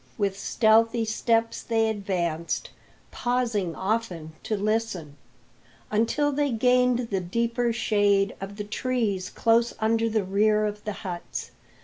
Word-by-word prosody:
With 200 -2 0
stealthy 225 +3 +3
steps 225 +1 0
they 225 -1 +1
advanced, 180 -6 -2 0.4
pausing 230 -8 -1
often 190 -6 -2
to 215 - -2
listen, 200 -8 -2 0.8
until 230 +7 +2
they 290 0 +1
gained 250 0 +2
the 195 - +1
deeper 235 +6 0
shade 205 -3 +2
of 195 +1 -6
the 210 - -4
trees 210 -3 -1
close 230 +1 +2
under 225 +1 +2
the 215 -2 +1
rear 210 +3 +2
of 210 0 -5
the 210 - -2
huts. 175 -2 -5
220 Hz, 125 wpm, -26 LUFS, 195-230 Hz, 0.8 s, stealthy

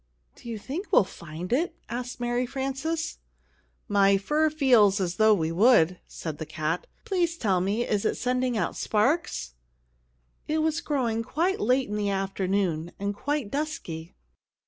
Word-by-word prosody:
"Do 235 - -11
you 225 - -3
think 295 - -6
we'll - - +6
find 170 +1 -7
it?" 320 +8 +1
asked 250 +1 -5
Mary 240 +1 0
Frances. 275 +6 -3 0.7
"My 200 -1 +4
fur 300 +10 +2
feels 245 -10 +4
as 180 -2 -2
though 215 0 +6
we 160 -3 -1
would," 180 -3 +4
said 155 -3 -6
the 160 - -4
cat. 160 +2 -2 0.2
"Please 345 -3 0
tell 195 - +1
me, 205 +6 0
is 205 -2 0
it - - 0
sending 250 -1 0
out 180 - -1
sparks?" 215 - 0 0.9
It 310 +1 +1
was 320 +1 0
growing 240 -6 0
quite 335 +11 0
late 255 +4 +2
in 210 +1 -3
the 205 -1 0
afternoon, 190 -3 -1
and 200 +1 -2
quite 285 +1 -2
dusky. 225 - -4
220 Hz, 155 wpm, -27 LUFS, 190-275 Hz, 0.9 s, we'll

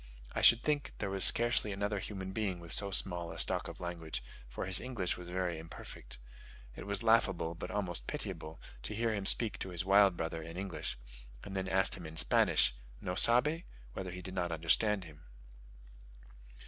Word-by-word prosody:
I - - -2
should 115 - +6
think 150 -2 -2
there 100 -2 -4
was 95 -1 +6
scarcely 120 -3 +7
another 100 +1 -3
human 95 -1 -7
being 95 -4 -3
with 85 -1 -10
so 100 - +4
small 90 -3 -1
a - - -9
stock - - 0
of - - -10
language, 85 -5 -5 0.3
for - - -5
his 95 0 +3
English 115 -9 -2
was 90 -1 -10
very 90 -2 -3
imperfect. 80 -5 -9 0.6
It - - -9
was 100 +2 -1
laughable, 95 -7 +2
but 85 - -8
almost 90 -11 -4
pitiable, 80 +1 -6 0.2
to 105 - -5
hear 115 +1 -1
him 100 -2 -2
speak 115 -4 +3
to 95 - -5
his 90 0 -4
wild 100 -2 +4
brother 80 0 -4
in 85 +2 -9
English, 95 -9 -5 0.5
and 100 - -8
then 95 0 -3
ask 95 0 +2
him 85 -3 -9
in 80 +1 -11
Spanish 65 -4 +3 0.3
("no 90 - -4
sabe?") 125 - +5 0.3
whether 95 +5 -6
he 90 +1 -8
did 95 - -8
not 90 -2 -2
understand 95 +5 +1
him. 75 -3 -14
95 Hz, 185 wpm, -32 LUFS, 85-105 Hz, 0.6 s, scarcely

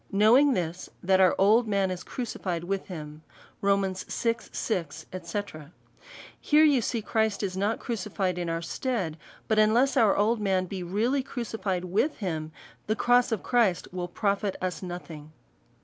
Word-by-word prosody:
'' - - -28
Knowing 270 +5 +6
this, 175 -2 -3
that 190 +1 +3
our 185 -1 +5
old 220 +4 +4
man 195 -2 +1
is 185 0 -4
crucified 185 -9 -4
with 195 +2 -3
him," 155 -4 -8
&c. - - -31 0.3
Rom. 200 0 +3
vi. 185 - -6
6. 180 -8 -3 1.3
Here 305 +1 +4
you 285 -5 +5
see 230 0 -2
Christ 220 -1 0
is 185 -2 -2
not 205 +4 0
crucified 195 -5 -2
in 175 -1 -2
our 165 0 -2
stead; 200 -8 -2 0.3
but 220 -1 +2
unless 235 +6 +4
our 225 -6 +4
old 215 +2 +2
man 190 -2 +1
be 185 +1 -6
really 220 +10 0
crucified 225 -8 -3
with 210 - 0
him, 160 -6 -3 0.4
the 215 - +1
cross 245 +1 +3
of 225 - -1
Christ 225 -8 +1
will 180 -1 -4
profit 200 +2 -1
us 185 -1 -3
nothing". 165 -4 -8
200 Hz, 165 wpm, -27 LUFS, 180-230 Hz, 1.3 s, Knowing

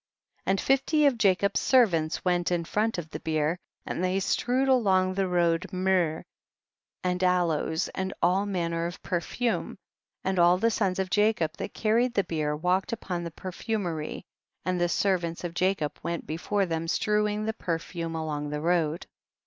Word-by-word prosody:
41. - - +2
And 195 - 0
fifty 285 +3 +3
of 275 -4 +4
Jacob's 200 -1 +3
servants 175 -13 +2
went 175 -1 +1
in 170 -1 0
front 215 +4 0
of 160 -3 -6
the - - -5
bier, 155 +2 0 0.3
and 180 - -3
they 185 +1 +1
strewed 250 +7 +1
along 190 -8 +3
the 195 0 0
road 170 -1 +1
myrrh 185 -4 +1 0.8
and 180 0 0
aloes, 170 -3 +1
and 190 0 -3
all 190 +4 +2
manner 170 -3 -1
of 175 - -9
perfume, 200 +7 -2 0.5
and 190 -1 0
all 175 +1 +6
the 230 +5 +2
sons 195 -5 0
of 190 -1 -2
Jacob 205 -7 +2
that - - -6
carried 235 +3 +2
the 200 - +3
bier 155 -4 -1
walked 180 +4 0
upon 180 -6 -3
the 170 - -4
perfumery, 180 -2 -4 0.4
and 180 -1 0
the 175 - +2
servants 175 -3 0
of 175 -1 -4
Jacob 180 -4 0
went 170 -1 -3
before 195 +5 -1
them 165 -1 -2
strewing 210 +3 +1
the 220 - -1
perfume 165 -3 -4
along 150 -2 -3
the 150 0 -3
road. 165 0 0
180 Hz, 165 wpm, -27 LUFS, 165-200 Hz, 0.8 s, all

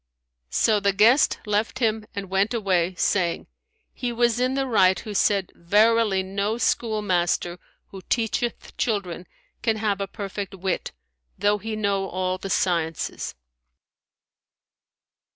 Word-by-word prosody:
So 215 - +3
the 200 -1 +1
guest 230 +8 +5
left 210 +4 0
him 220 -3 0
and 200 -1 -4
went 195 +5 +1
away, 185 -4 +1
saying, 175 -1 0 0.5
"He 245 -2 -3
was 240 0 +2
in 255 +1 +1
the 270 0 0
right 190 -7 +4
who 215 - -7
said, 200 -1 +2
Verily 210 +2 +3
no 200 +3 -2
schoolmaster 185 -7 0 0.3
who 195 - -9
teacheth 235 0 -1
children 185 -6 -2 0.3
can 225 -2 +1
have 205 -2 -1
a 195 - -2
perfect 195 -1 -6
wit, 190 -1 -2 0.5
though 205 0 +2
he 220 +2 -4
know 200 -2 0
all 185 0 -2
the 195 - -6
sciences.'" 165 -4 -1
200 Hz, 130 wpm, -24 LUFS, 190-220 Hz, 0.5 s, guest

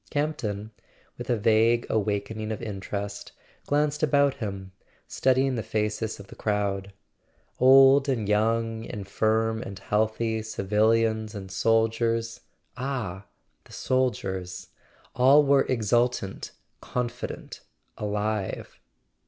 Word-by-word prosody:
Campton, 110 -9 -2 0.4
with - - -8
a 120 - +2
vague 115 +2 +3
awakening 110 +1 -2
of 110 - -3
interest, 100 -1 -5 0.3
glanced 150 0 +1
about 140 -2 +3
him, 100 -6 -6 0.4
studying 130 +1 +2
the 115 - -2
faces 105 0 -2
of 100 - -10
the - - -13
crowd. 100 -2 -1 0.7
Old 135 +2 +7
and 115 -6 -1
young, 115 +2 +1
infirm 110 +1 -1
and 100 - -7
healthy, 110 +3 0
civilians 110 +1 +1
and 95 -2 -7
sol¬ 115 +4 +3
diers—ah, 115 -2 -4 0.4
the - - -18
soldiers!—all 125 +4 0
were 140 0 +4
exultant, 120 -3 0 0.3
confident, 125 -1 -5 0.4
alive. 105 -1 -3
110 Hz, 100 wpm, -26 LUFS, 105-125 Hz, 0.7 s, Old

